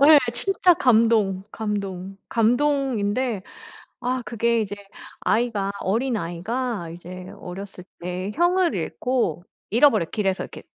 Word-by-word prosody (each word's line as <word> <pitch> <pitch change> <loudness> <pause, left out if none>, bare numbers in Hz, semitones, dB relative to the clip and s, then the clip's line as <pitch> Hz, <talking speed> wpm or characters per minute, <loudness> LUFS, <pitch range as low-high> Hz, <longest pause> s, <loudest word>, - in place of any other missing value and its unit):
네. 295 +2 +9 0.2
진짜 370 +4 +3
감동, 225 - +3
감동, 195 -3 -4
감동인데 245 -3 +1 0.6
아 255 +1 -1
그게 235 0 +1
이제 205 -2 -3 0.5
아이가 215 -4 +1
어린아이가 220 -1 -1
이제 180 +2 -9
어렸을 185 0 -8 0.2
때 180 +2 -3
형을 350 -2 +3
잃고 180 - -1 0.3
잃어버려요 225 - +4
길에서 195 -3 0
이렇게. - - -10
220 Hz, 250 characters per minute, -24 LUFS, 190-250 Hz, 0.6 s, 네